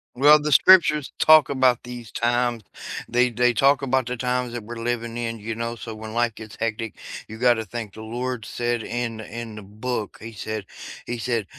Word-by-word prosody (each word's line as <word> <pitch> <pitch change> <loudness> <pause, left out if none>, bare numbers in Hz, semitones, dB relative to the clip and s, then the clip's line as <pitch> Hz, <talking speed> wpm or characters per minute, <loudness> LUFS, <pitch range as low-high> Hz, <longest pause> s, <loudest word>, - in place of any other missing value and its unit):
Well, 145 +4 +7
the 150 - -1
scriptures 150 -4 +6
talk 155 -1 +7
about 130 -3 +2
these 120 -3 -9
times. 120 -1 0 0.4
They 125 +1 +3
they 125 +1 +2
talk 135 +3 +4
about 130 -2 +1
the 125 0 -3
times 125 0 -1
that 120 - -5
we're 120 +2 -8
living 115 0 -3
in, 115 -1 -3
you 110 +2 -5
know, 115 +1 -4
so 115 -1 -7
when 110 0 -8
life 120 0 +1
gets 110 -1 -11
hectic, 115 -1 -3 0.3
you 110 - -9
gotta 120 -2 +3
think 110 -1 -6
the 110 - -10
Lord 120 +2 -4
said 120 +1 -2
in 115 -1 -3
in 115 +1 -7
the 105 - -8
book, 105 +2 -5
he 115 +1 -8
said 110 0 -5 0.4
He 120 0 -4
said, 115 -2 -1
120 Hz, 195 wpm, -23 LUFS, 110-125 Hz, 0.4 s, Well